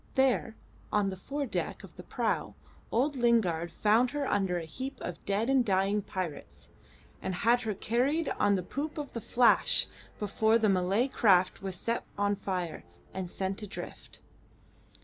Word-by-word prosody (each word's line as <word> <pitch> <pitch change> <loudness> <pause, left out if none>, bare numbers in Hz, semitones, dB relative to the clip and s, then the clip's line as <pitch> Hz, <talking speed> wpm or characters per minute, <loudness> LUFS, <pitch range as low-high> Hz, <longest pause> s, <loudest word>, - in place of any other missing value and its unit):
There, 260 -4 +2 0.4
on 205 -2 +2
the - - -5
fore 280 +9 -4
deck 245 - -3
of - - -13
the - - -9
prau, - - -2 0.4
old 275 +5 +1
Lingard 190 -9 +2
found 225 +4 +3
her 290 +1 -2
under 195 -7 +1
a 170 - -4
heap 260 - -6
of - - -6
dead 205 +3 0
and 265 -1 +4
dying 200 0 +1
pirates, 185 -6 -6 0.5
and 190 - -2
had 235 +6 +3
her 220 -4 -2
carried 260 - +1
on 205 -1 +4
the 185 - -2
poop 295 - -4
of 295 -2 -5
the 230 - -4
Flash 240 +3 +4 0.3
before 220 +2 +2
the 220 -2 +2
Malay 195 +6 +2
craft 190 -8 +3
was 190 -2 -4
set 230 +6 -1
on 205 0 +2
fire 180 -4 -3 0.3
and 185 -2 -4
sent 190 +3 -2
adrift. 210 0 -9
210 Hz, 165 wpm, -30 LUFS, 190-245 Hz, 0.5 s, and